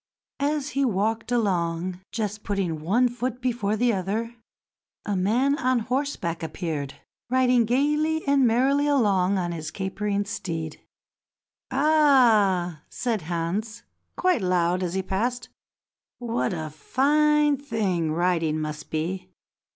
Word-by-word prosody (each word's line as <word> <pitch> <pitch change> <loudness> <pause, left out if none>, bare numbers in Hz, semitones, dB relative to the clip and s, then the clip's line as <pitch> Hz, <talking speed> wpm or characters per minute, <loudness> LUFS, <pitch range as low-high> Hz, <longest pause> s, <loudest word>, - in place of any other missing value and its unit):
As 290 0 0
he 275 -1 0
walked 225 0 0
along, 180 -5 0
just 215 -1 -3
putting 185 -6 -2
one 225 +10 +3
foot 245 0 -4
before 235 -5 -1
the 240 +1 +2
other, 215 +5 -2 0.7
a 205 - -1
man 235 +10 +2
on 255 -4 +2
horseback 235 - -2
appeared, 160 -4 -4 0.3
riding 250 -2 +3
gaily 300 +6 +1
and 275 -2 +4
merrily 270 +5 +2
along 200 -9 +2
on 175 -2 -1
his 160 -2 -5
capering 200 +3 -2
steed. 165 -6 -5 0.9
"Ah!" 240 - +3
said 230 -5 -2
Hans 180 +7 -3 0.3
quite 365 - +2
loud 180 -1 +1
as 180 0 -2
he 190 - 0
passed, 240 +6 -2 0.7
"what 240 -1 -1
a 155 -3 -4
fine 295 - +2
thing 205 - -1
riding 165 -2 +1
must 155 0 -5
be. 180 +4 -3
210 Hz, 120 wpm, -25 LUFS, 180-255 Hz, 0.9 s, and